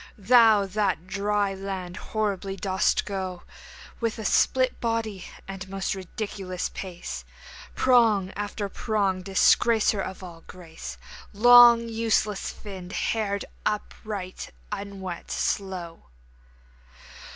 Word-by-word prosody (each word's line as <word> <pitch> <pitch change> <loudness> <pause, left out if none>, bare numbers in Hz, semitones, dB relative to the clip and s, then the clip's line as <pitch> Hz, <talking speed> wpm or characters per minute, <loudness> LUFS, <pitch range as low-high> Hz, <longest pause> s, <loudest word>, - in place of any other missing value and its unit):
Thou 220 -1 +5
that 205 +2 0
on 170 - -23
dry 200 +1 0
land 190 -2 -5
horribly 200 -2 -3
dost 190 0 +1
go 185 -3 -4 0.6
With 230 -1 -1
a 220 - -6
split 255 +5 +2
body 225 -4 -2 0.2
and 195 -1 -7
most 195 0 -2
ridiculous 190 -1 -5
pace, 170 - -7 0.5
Prong 225 -7 +4
after 205 0 -3
prong, 200 -2 -1
disgracer 205 +2 +3
of 190 0 -6
all 170 -2 -10
grace, 170 -3 -9 0.4
Long 240 +1 +8
useless 220 -3 0
finned, 190 -3 -9
haired, 200 -3 -1 0.2
upright, 205 -2 -4 0.2
unwet, 195 -3 -6
slow! 180 -4 -3
200 Hz, 105 wpm, -26 LUFS, 185-215 Hz, 0.6 s, Long